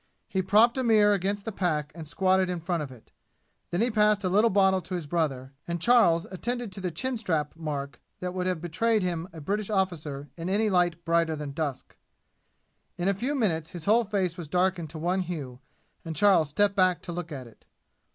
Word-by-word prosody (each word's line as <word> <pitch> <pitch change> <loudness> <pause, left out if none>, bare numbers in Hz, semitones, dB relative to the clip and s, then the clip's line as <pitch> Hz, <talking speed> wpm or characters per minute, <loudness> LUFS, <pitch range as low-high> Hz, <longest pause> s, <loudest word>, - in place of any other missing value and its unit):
He 190 - -1
propped 215 +7 +4
a - - 0
mirror 215 -3 +5
against 200 +1 -1
the 225 - -3
pack 155 -7 -1
and 160 -1 -8
squatted 185 +2 +2
in 180 -1 -2
front 170 0 -2
of 140 -3 -6
it. 125 -4 -16 0.6
Then 175 - -1
he 240 +1 +2
passed 210 -1 +3
a 185 - +1
little 210 +5 +4
bottle 190 -1 +3
to 180 +2 -5
his 175 -3 -4
brother, 140 -5 -2
and 170 0 -2
Charles 175 -6 +4
attended 240 +3 -3
to 190 - -7
the 185 - -1
chin 250 +10 -2
strap 160 -9 -1
mark 145 -3 -5 0.2
that 180 0 -4
would 185 0 -2
have 180 -4 -1
betrayed 205 +6 +1
him 175 -1 -2
a 165 - -10
British 200 +7 -2
officer 160 -8 -2
in 170 +2 -4
any 210 +2 +2
light 175 -2 +1
brighter 165 -1 +2
than 150 -2 -5
dusk. 140 -3 -4 1.0
In 180 +2 0
a - - +3
few 250 +9 -2
minutes 165 - 0
his 175 -3 -8
whole 225 +3 +4
face 195 -5 -1
was 165 - -6
darkened 180 -1 0
to 160 - -8
one 175 +4 0
hue, 150 -9 -6 0.4
and 165 -1 -5
Charles 175 -3 +4
stepped 200 +6 +2
back 185 -2 +2
to 175 - -5
look 170 -1 -5
at 135 -4 -6
it. 115 - -18
180 Hz, 210 wpm, -27 LUFS, 160-200 Hz, 1.0 s, mirror